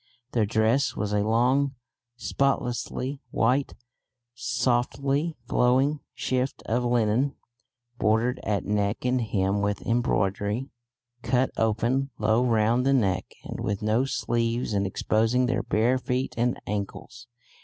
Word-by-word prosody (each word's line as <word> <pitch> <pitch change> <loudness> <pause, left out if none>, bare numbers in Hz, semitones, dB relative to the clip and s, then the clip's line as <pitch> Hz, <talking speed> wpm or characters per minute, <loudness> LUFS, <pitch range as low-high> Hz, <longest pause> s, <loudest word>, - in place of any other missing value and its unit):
Their 110 -4 +1
dress 115 +5 +2
was 105 -1 -2
a 105 - +2
long 125 +6 +2 0.4
spotlessly 130 +1 -1
white 130 +5 +1 0.6
softly 135 +6 0
flowing 130 +6 +2 0.2
shift 130 +1 -2
of 120 +2 0
linen, 120 +3 +1 0.6
bordered 110 +4 +2
at 105 -2 -1
neck 105 +2 -1
and 125 0 +2
hem 100 -2 0
with 100 0 -1
embroidery, 105 +1 0 0.5
cut 130 +1 +1
open 120 +5 +1
low 110 +3 +2
round 115 0 +2
the 135 +1 +3
neck, 100 -9 +1
and - - -6
with 100 0 -2
no 110 +4 +2
sleeves 120 -3 -1
and 100 -1 +1
exposing 115 +6 +1
their 125 +1 0
bare 120 +4 +1
feet 125 +1 -2
and 120 +1 0
ankles. 105 +3 -5
120 Hz, 125 wpm, -26 LUFS, 110-130 Hz, 0.6 s, the